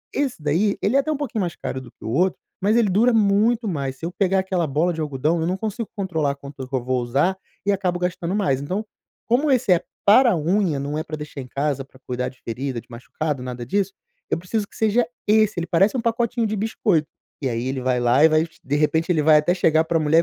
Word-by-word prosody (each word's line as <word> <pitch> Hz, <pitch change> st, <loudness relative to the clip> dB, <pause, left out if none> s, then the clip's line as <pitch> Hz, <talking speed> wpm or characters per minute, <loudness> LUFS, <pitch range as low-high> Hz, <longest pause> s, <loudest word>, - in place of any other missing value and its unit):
Esse 275 Hz, -6 st, -1 dB
daí, 170 Hz, +8 st, +1 dB
ele 215 Hz, +7 st, +1 dB
é -, -, +6 dB
até 310 Hz, +3 st, 0 dB
um 300 Hz, -, -1 dB
pouquinho 255 Hz, -7 st, -3 dB
mais 175 Hz, -3 st, -2 dB
caro 130 Hz, -, -5 dB
do 125 Hz, -, -12 dB
que -, -, -14 dB
o -, -, -3 dB
outro, 175 Hz, +9 st, +1 dB, 0.2 s
mas 210 Hz, +4 st, +3 dB
ele 230 Hz, -3 st, +4 dB
dura 225 Hz, +7 st, +4 dB
muito 220 Hz, +2 st, +3 dB
mais. 140 Hz, -7 st, -2 dB
Se -, -, -6 dB
eu 175 Hz, -, -3 dB
pegar 190 Hz, 0 st, +1 dB
aquela 185 Hz, -3 st, 0 dB
bola 155 Hz, +6 st, +1 dB
de 160 Hz, -, -4 dB
algodão, 150 Hz, +3 st, 0 dB
eu 165 Hz, -, 0 dB
não 185 Hz, +1 st, -1 dB
consigo 220 Hz, +2 st, -4 dB
controlar 160 Hz, -8 st, -1 dB
quanto 140 Hz, -1 st, -9 dB
que 135 Hz, -, -2 dB
eu 125 Hz, -, -1 dB
vou 130 Hz, 0 st, 0 dB
usar 140 Hz, +10 st, +1 dB, 0.3 s
e 205 Hz, -, +3 dB
acabo 185 Hz, -3 st, 0 dB
gastando 180 Hz, +1 st, -2 dB
mais. 140 Hz, -10 st, +1 dB
Então, 190 Hz, +9 st, -3 dB, 0.4 s
como 265 Hz, +6 st, +2 dB
esse 245 Hz, -7 st, +2 dB
é 170 Hz, -, +1 dB, 0.2 s
para 235 Hz, +4 st, +7 dB
a -, -, +2 dB
unha, 170 Hz, -1 st, +1 dB
não 145 Hz, +2 st, -3 dB
é -, -, -2 dB
para 155 Hz, -, -6 dB
deixar 150 Hz, -2 st, -7 dB
em 125 Hz, -, -9 dB
casa 140 Hz, +1 st, -1 dB
para 130 Hz, 0 st, -20 dB
cuidar 125 Hz, 0 st, -2 dB
de 130 Hz, -, -19 dB
ferida, 125 Hz, +2 st, -3 dB
de -, -, -26 dB
machucado, 135 Hz, +4 st, -4 dB
nada 125 Hz, -1 st, -6 dB
disso, 195 Hz, +3 st, 0 dB, 0.4 s
eu -, -, +1 dB
preciso 200 Hz, +4 st, -2 dB
que -, -, -20 dB
seja 225 Hz, +2 st, +2 dB, 0.2 s
esse, 215 Hz, -3 st, +3 dB
ele 170 Hz, -, -2 dB
parece 195 Hz, +10 st, +3 dB
pacotinho 235 Hz, 0 st, 0 dB
de 215 Hz, -, -2 dB
biscoito." 200 Hz, -6 st, 0 dB, 0.3 s
E 135 Hz, -, 0 dB
aí 115 Hz, +1 st, -2 dB
ele 130 Hz, -1 st, -2 dB
vai 125 Hz, -1 st, +1 dB
lá 120 Hz, +5 st, +4 dB
e 160 Hz, -, +8 dB
vai, 155 Hz, +1 st, +3 dB, 0.2 s
de 140 Hz, -, -1 dB
repente 160 Hz, +3 st, +1 dB
ele 155 Hz, -3 st, +2 dB
vai 155 Hz, 0 st, +7 dB
até 150 Hz, +4 st, +2 dB
chegar 160 Hz, -3 st, +3 dB
para 165 Hz, -, +1 dB
a -, -, 0 dB
mulher 155 Hz, +2 st, +4 dB
170 Hz, 250 wpm, -22 LUFS, 140-205 Hz, 0.4 s, e